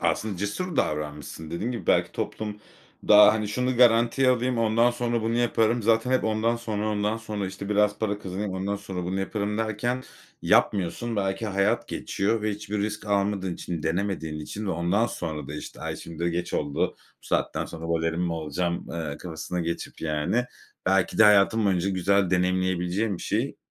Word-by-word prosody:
aslında 105 -4 0
cesur 125 - -3
davranmışsın. 75 +1 -2
Dediğin 100 +9 -2
gibi 110 -8 -6
belki - - +3
toplum 105 -1 -4 0.5
daha, 105 0 +9
hani, 110 -1 -1
"Şunu 125 +3 0
garantiye 120 +2 +5
alayım, 125 -1 +2
ondan 115 +2 +3
sonra 120 -1 -1
bunu 115 +1 0
yaparım." 120 -1 +2
zaten 115 +3 +2
hep 130 - +2
ondan 110 +2 +1
sonra, 110 -2 -2
ondan 105 +1 0
sonra, 105 -3 -4
işte, 95 +1 -6
"Biraz 105 0 +2
para 105 -2 -1
kazanayım, 100 +1 -4
ondan 95 +2 -2
sonra 95 -3 -5
bunu 95 +2 -2
yaparım." 105 +1 -2
derken 110 +4 -1 0.4
yapmıyorsun. 105 +5 +2
Belki 95 +2 -1
hayat 100 0 +1
geçiyor 105 +3 -1
ve 110 - +1
hiçbir 105 0 -4
risk 105 +1 -3
almadığın 100 -2 0
için, 85 -3 -5
denemediğin 80 -2 -2
için 105 +7 -6
ve 95 - 0
ondan 90 +7 +1
sonra 75 - -5
da, 75 - -5
işte, - - -8
"Ay, - - -4
şimdi 85 -1 -9
de - - +2
geç 85 +1 -3
oldu, 75 -1 -2 0.4
bu - - -14
saatten - - 0
sonra 80 0 -7
balerin 80 0 0
mi 85 -1 0
olacağım?" 85 +2 -2
eee, 80 -4 -4
kafasına 85 +1 -5
geçip, 85 0 -4
yani, 80 +10 0 0.4
belki 95 -1 +2
de 110 - +8
hayatın 105 +2 +5
boyunca 95 -1 +2
güzel 95 0 +2
deneyimleyebileceğin 90 +2 +1
bir - - -9
şeyi - - -1
100 Hz, 175 wpm, -26 LUFS, 90-110 Hz, 0.5 s, daha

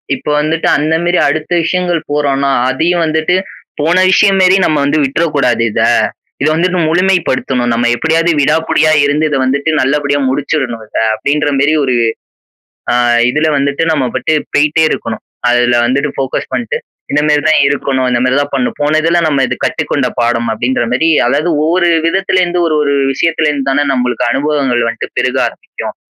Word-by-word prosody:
இப்ப - - -12
வந்துட்டு 155 +2 -1
அந்தமேரி 160 +4 0
அடுத்த 155 +3 -3
விஷயங்கள் 175 0 -1
போறோன்னா, 140 -2 0 0.2
அதையும் 165 +6 0
வந்துட்டு 160 +3 0 0.4
போன 165 +4 +1 0.2
விஷயம்மேரி 190 -1 +4
நம்ம 155 -2 +1
வந்து 150 +2 +1
விட்டுற 140 +5 0
கூடாது 120 -4 +1
இத. - - -1 0.6
இத 150 - +2
வந்துட்டு 180 +2 0
முழுமை 185 +3 +2
படுத்தணும், 125 -2 -1
நம்ம 120 +1 0
எப்பிடியாவது 165 +6 +1
விடாப்புடியா 155 +2 +1
இருந்து 150 +2 0
இத 140 - -1
வந்துட்டு 140 +4 -1
நல்லபடியா 145 +1 0
முடிச்சுர்ணும் 130 -4 -2
இத, - - -6 0.2
அப்பிடின்றமாரி 145 +3 0
ஒரு 125 - 0 1.0
ஆ - - +1 0.4
இதுல 150 +3 0
வந்துட்டு 140 +2 -1
நம்மபாட்டு 130 0 -1 0.2
போயிட்டே 150 +2 +2
இருக்கணும். 110 -1 -4 0.3
அதுல 120 0 +2
வந்துட்டு 140 +4 0
ஃபோகஸ் 135 -1 -3
பண்ட்டு 245 - -2 0.3
இந்தமாரி 150 0 +2
தான் 155 - +4
இருக்கணும். 135 -2 -1
இந்தமாரி 125 +2 +1
தான் 145 - -7
பண்ணணும் 125 -2 -1
போன 150 +2 +1
இதுல 170 +2 +2
நம்ம 140 -3 +1
இது - - -2
கற்றுக்கொண்ட - - -1
பாடம் 120 -1 0
அப்பிடின்றமாரி 125 +5 0 0.2
அதாவது 150 +5 0
ஒவ்வொரு 175 +2 +1 0.2
விதத்துல 185 +1 0
இருந்து 175 0 -2
ஒரு 155 - 0
ஒரு 140 -1 0 0.2
விஷயத்துல 160 +1 0
இருந்து 140 -2 -2
தானே 145 +2 +1
நம்மளுக்கு 125 -1 -1
அனுபவங்கள் 135 -4 0
வந்துட்டு - - -6
பெருக - - 0
ஆரம்பிக்கும். - - -8
145 Hz, 155 wpm, -13 LUFS, 130-160 Hz, 1.0 s, விஷயம்மேரி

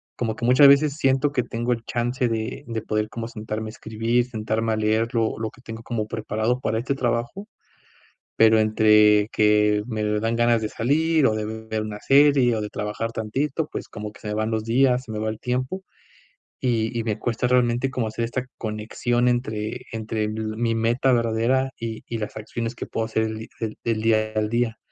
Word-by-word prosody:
como 110 -2 -2
que - - -10
muchas 130 +3 +7
veces 140 +1 +5
siento 135 0 +2
que 125 -4 0
tengo 120 +1 -3
el 115 -1 -1
chance 120 +1 -1
de 115 +3 -3
de 115 -1 -3
poder 110 0 -1
como 115 0 -5
sentarme 110 -1 -5
a - - -7
escribir, 115 +3 -1
sentarme 110 -1 -1
a - - +1
leer 110 +2 +1
lo 115 -2 0
lo 110 -1 -3
que 135 - -19
tengo 115 -2 -8
como 110 -3 -3
preparado 110 +3 -1
para 110 -3 -1
este 130 +4 -2
trabajo, 120 - -2 0.9
pero 110 0 +5
entre 105 -1 +5
que, 105 0 +3
me 110 -3 -2 0.2
dan 115 +2 0
ganas 120 -1 +3
de 110 - -2
salir 155 +5 +2
o 110 - +1
de 110 - -2
ver 110 0 -4
una 105 -1 -6
serie 140 -4 +4
o 110 - -2
de 105 - -4
trabajar 105 +3 -3
tantito, 135 +8 -2
pues - - -5
como 105 0 -7
que - - -17
se - - -7
me - - -2
van 110 +1 -1
los 110 -1 -1
días, 125 +2 +3
se 120 - -10
me 105 - -3
va 110 0 -1
el 110 0 -5
tiempo, 130 +9 -2 0.8
y 120 -2 0
y 115 - -1
me 110 -2 -1
cuesta 120 +1 -1
realmente 125 +1 +2
como 125 -3 -1
hacer 110 +2 -3
esta 125 +2 -3
conexión 115 +3 -1
entre 110 -3 -1
entre 110 -1 -2
mi 110 +1 -2
meta 120 +4 +2
verdadera 120 +3 +1
y 115 -1 -5
y 115 - -4
las 105 0 -5
acciones 115 +2 -4
que - - -5
puedo 110 - -2
hacer 110 0 0
el 110 0 -3
di 110 - -8
el 110 -1 -4
el 115 -2 0
día 110 -1 +2
al 105 0 0
día. 115 0 0
115 Hz, 205 wpm, -24 LUFS, 110-125 Hz, 0.9 s, muchas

